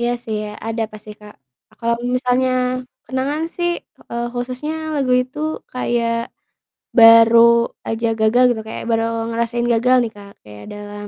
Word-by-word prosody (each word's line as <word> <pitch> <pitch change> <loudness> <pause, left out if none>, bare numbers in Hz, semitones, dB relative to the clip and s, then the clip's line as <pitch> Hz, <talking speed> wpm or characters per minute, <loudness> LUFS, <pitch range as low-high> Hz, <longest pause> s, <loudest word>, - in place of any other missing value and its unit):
Iya 240 0 0
sih 220 - -4
ya, 210 - -6 0.2
ada 225 0 -2
pasti 215 0 -11
Kak 210 0 -13 0.5
kalau 235 0 0 0.2
misalnya 250 0 +1 0.6
kenangan 275 +4 -2
sih, 345 0 0 0.4
eee, 235 0 -2
khususnya 255 +5 -4 0.2
lagu 275 -3 -1
itu 255 +3 -7 0.3
kayak 240 -2 -1 0.9
baru 230 0 +8 0.5
aja 225 +1 -1
gagal 220 +3 +4
gitu 225 -2 -3
kayak - - -6
baru 225 0 +2 0.3
ngerasain 235 +1 -1
gagal 250 +3 +3
nih 230 - -4
Kak, 200 -1 -13
kayak 105 -1 -12
dalam 205 0 -8
235 Hz, 145 wpm, -19 LUFS, 220-250 Hz, 0.9 s, baru